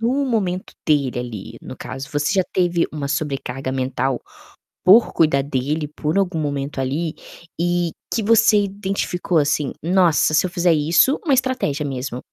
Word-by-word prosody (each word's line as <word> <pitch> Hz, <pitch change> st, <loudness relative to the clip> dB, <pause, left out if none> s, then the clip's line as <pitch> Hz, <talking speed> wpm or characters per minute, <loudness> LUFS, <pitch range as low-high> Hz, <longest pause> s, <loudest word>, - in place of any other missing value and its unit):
no 260 Hz, +5 st, +1 dB
momento 190 Hz, -7 st, -2 dB
dele 140 Hz, -5 st, +1 dB
ali, 115 Hz, -5 st, -7 dB
no -, -, -9 dB
caso, 135 Hz, +1 st, -7 dB
você 145 Hz, +4 st, 0 dB
já 190 Hz, -, +3 dB
teve 175 Hz, -2 st, +1 dB
uma 145 Hz, -2 st, -4 dB
sobrecarga 135 Hz, -2 st, -3 dB
mental 130 Hz, -1 st, -1 dB, 0.6 s
por 210 Hz, +6 st, +6 dB
cuidar 145 Hz, -4 st, +3 dB
dele 145 Hz, +3 st, -2 dB
por 155 Hz, +5 st, -1 dB
algum 190 Hz, -4 st, 0 dB
momento, 140 Hz, -2 st, -3 dB
ali, 150 Hz, +5 st, -2 dB, 0.5 s
e 175 Hz, -1 st, 0 dB, 0.2 s
que 225 Hz, -, 0 dB
você 220 Hz, -1 st, +5 dB
identificou 195 Hz, -3 st, -2 dB
assim: 145 Hz, -2 st, +1 dB
"Nossa, 175 Hz, -3 st, +3 dB
se 155 Hz, -, +4 dB
eu -, -, -2 dB
fizer 175 Hz, -2 st, +2 dB
isso 160 Hz, -, +3 dB
uma 285 Hz, -5 st, +3 dB
estratégia 250 Hz, -, -1 dB
mesmo, 130 Hz, -2 st, -4 dB
155 Hz, 155 wpm, -21 LUFS, 140-190 Hz, 0.6 s, por